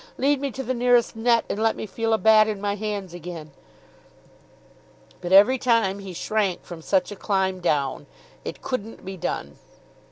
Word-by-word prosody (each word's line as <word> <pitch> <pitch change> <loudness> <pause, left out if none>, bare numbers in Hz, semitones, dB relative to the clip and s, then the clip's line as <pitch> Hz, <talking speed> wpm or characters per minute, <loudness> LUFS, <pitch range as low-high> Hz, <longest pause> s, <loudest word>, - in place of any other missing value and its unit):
Lead 280 +1 +2
me 280 - -1
to 265 - -5
the 255 - -2
nearest 245 -1 +2
net, 230 0 +2
and 210 - -3
let 225 0 +2
me - - -5
feel 225 +3 -2
a 220 - +4
bat 215 -1 +5
in 210 -2 -3
my 205 0 -1
hands 205 -3 -4
again." 170 -3 -8 1.7
But 175 0 -5
every 210 +7 +7
time 230 -6 +2
he 195 -1 -8
shrank 200 +1 -1
from 170 -2 -9
such 190 +5 +1
a - - -6
climb 190 -2 -1
down. 145 -6 -1 0.4
It - - -7
couldn't 225 -5 -5
be 190 0 -6
done. 180 - -4
210 Hz, 180 wpm, -24 LUFS, 190-230 Hz, 1.7 s, every